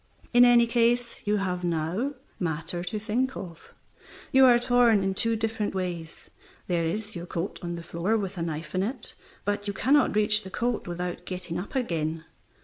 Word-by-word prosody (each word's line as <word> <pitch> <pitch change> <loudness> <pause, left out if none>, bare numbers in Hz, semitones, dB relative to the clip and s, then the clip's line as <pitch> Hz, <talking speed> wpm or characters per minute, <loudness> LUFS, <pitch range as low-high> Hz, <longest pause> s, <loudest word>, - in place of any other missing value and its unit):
In 245 0 +8
any 240 -1 +6
case 235 0 +1
you 210 0 +3
have 180 -2 -2
now 175 - -1 0.2
matter 165 0 -2
to 180 +4 -3
think 235 +5 -1
of. 170 -3 -9 0.6
You 265 0 +7
are 245 -2 +7
torn 240 -4 +4
in 195 0 0
two 230 +4 0
different 220 -2 -2
ways. 175 -3 -5 0.3
There 175 -2 0
is 210 +5 -3
your 170 0 -6
coat 170 +3 -4
on 175 -1 -4
the 170 - -7
floor 170 +7 0
with 200 -2 -3
a - - -2
knife 160 -1 -4
in 185 - +1
it, 230 +4 -3 0.3
but 205 0 -1
you 200 - -1
cannot 270 +2 +3
reach 210 0 +4
the 190 - -8
coat 240 +3 -2
without 175 0 -4
getting 180 -2 -4
up 200 +9 -7
again. 165 -9 -1
195 Hz, 185 wpm, -27 LUFS, 175-230 Hz, 0.6 s, In